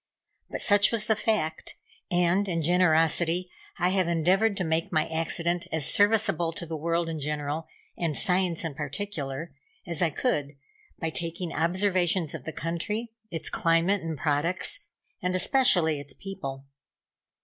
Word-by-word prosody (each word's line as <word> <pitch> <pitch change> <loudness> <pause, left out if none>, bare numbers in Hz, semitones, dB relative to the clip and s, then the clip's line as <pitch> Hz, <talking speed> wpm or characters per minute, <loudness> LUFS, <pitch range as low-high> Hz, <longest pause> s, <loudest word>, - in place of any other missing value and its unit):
But - - -1
such 205 0 +5
was 225 -2 +1
the 220 - +2
fact, 210 -7 -1 0.3
and, 180 +3 +2
in 165 -2 -1
generosity, 170 +1 +3 0.3
I 180 -1 +2
have 185 -2 +2
endeavored 185 +6 +2
to 185 - 0
make 160 0 -1
my 155 -1 +1
accident 170 +2 -1
as 160 -4 +2
serviceable 200 -5 +3
to 170 - -6
the 165 -1 -5
world 165 +2 -1
in 160 -1 -4
general, 150 +2 -3 0.3
and 165 -4 -1
Science 180 -2 +1
in 165 -3 -3
particular, 150 0 -5 0.3
as 170 -3 -1
I 170 - +3
could, 145 - -1 0.4
by 165 -1 -3
taking 170 0 -3
observations 180 -1 +1
of - - -7
the 160 - -4
country, 210 +9 -3 0.2
its 165 -2 -6
climate 170 +4 +2
and 165 -2 -4
products, 160 - -1 0.4
and 180 0 -1
especially 180 - +3
its 145 0 -10
people. 135 -9 -7
170 Hz, 150 wpm, -27 LUFS, 160-185 Hz, 0.4 s, such